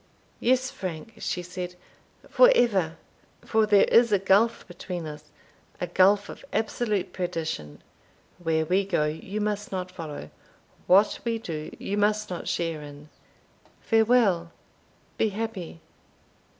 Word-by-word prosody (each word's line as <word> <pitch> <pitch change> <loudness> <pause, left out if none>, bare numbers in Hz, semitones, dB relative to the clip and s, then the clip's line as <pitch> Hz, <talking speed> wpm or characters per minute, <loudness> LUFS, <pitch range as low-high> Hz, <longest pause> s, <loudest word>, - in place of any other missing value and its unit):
Yes, 255 +1 +2
Frank," 185 +4 -6
she 180 - -3
said, 180 0 -6 0.5
"for - - +6
ever! 190 - +2 0.7
there 205 -1 +6
is 235 -1 +5
a 200 - +5
gulf 200 +5 +2
between 175 -1 -6
us 150 -1 -8 0.5
a - - -1
gulf 195 +4 +3
of - - -10
absolute 215 -2 -1
perdition; 160 - -4 0.6
where 160 -2 0
we 185 +4 +2
go, 175 -6 0
you 160 +7 -4
must 210 0 -2
not 185 -1 -4
follow 150 - -8 0.6
what 200 +3 +5
we 230 -1 -1
do, 155 -8 -6
you 205 - -3
must 210 0 +1
not 180 - -5
share 165 -3 -2
in 145 0 -11 0.7
Farewell 220 -7 +3 0.7
be 220 - +3
happy!" 200 -6 -5
185 Hz, 125 wpm, -26 LUFS, 165-215 Hz, 0.7 s, for